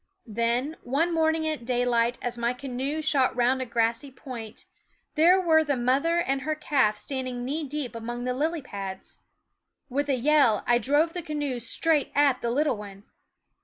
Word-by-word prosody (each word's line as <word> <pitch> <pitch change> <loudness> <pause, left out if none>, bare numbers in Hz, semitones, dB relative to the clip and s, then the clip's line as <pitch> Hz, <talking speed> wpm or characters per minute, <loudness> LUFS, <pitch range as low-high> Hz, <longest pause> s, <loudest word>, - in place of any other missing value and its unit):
Then, 235 +6 -1
one 305 +8 0
morning 320 -1 +1
at 310 -5 -3
daylight 245 -1 +1
as 245 -1 -2
my 235 +1 0
canoe 270 +4 -4
shot 275 -4 +2
round 250 +2 +2
a 260 - -3
grassy 230 +3 0
point, 240 -4 -9 0.5
there 345 +5 +5
were 320 -3 +4
the 285 -3 -1
mother 270 +8 +1
and 275 -6 0
her 310 +3 -2
calf 270 -8 +1
standing 255 -3 -4
knee 300 +5 -2
deep 285 -2 -4
among 240 +1 -5
the 250 0 -1
lily 310 +3 -1
pads. 195 -5 -7 0.7
With 285 +3 -1
a 270 - +3
yell 265 -4 +3
I 240 0 +3
drove 290 +7 +2
the 355 - -3
canoe 290 -5 -3
straight 290 +5 +1
at 280 -3 +3
the 235 - -1
little 280 0 +1
one. 200 -1 -10
260 Hz, 170 wpm, -26 LUFS, 240-300 Hz, 0.7 s, there